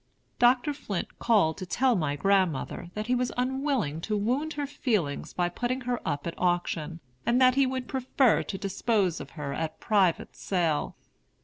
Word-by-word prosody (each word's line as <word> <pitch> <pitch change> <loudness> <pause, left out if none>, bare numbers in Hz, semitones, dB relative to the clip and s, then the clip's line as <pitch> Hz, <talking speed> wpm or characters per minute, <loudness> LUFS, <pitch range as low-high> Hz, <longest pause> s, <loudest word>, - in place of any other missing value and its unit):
Dr. 250 +4 +4
Flint 205 -10 -5
called 195 -9 +3
to 185 - -4
tell 255 +6 +2
my 155 -6 0
grandmother 185 -2 0
that 215 0 -3
he 245 - 0
was 250 0 0
unwilling 255 - -1
to 210 +4 -1
wound 260 +9 0
her 290 -1 -2
feelings 215 - -1
by 175 -1 0
putting 245 +8 -2
her 245 -1 -2
up 145 -2 -2
at 170 - -3
auction, 175 -2 -1 0.2
and 240 +1 +2
that 255 -1 +6
he 270 0 +3
would 260 -1 -3
prefer 260 -2 +2
to 195 - -5
dispose 195 -2 0
of 140 - -8
her 140 -2 -3
at 160 +1 -4
private 195 -6 +1
sale. 170 -6 -1
210 Hz, 175 wpm, -28 LUFS, 170-255 Hz, 0.2 s, that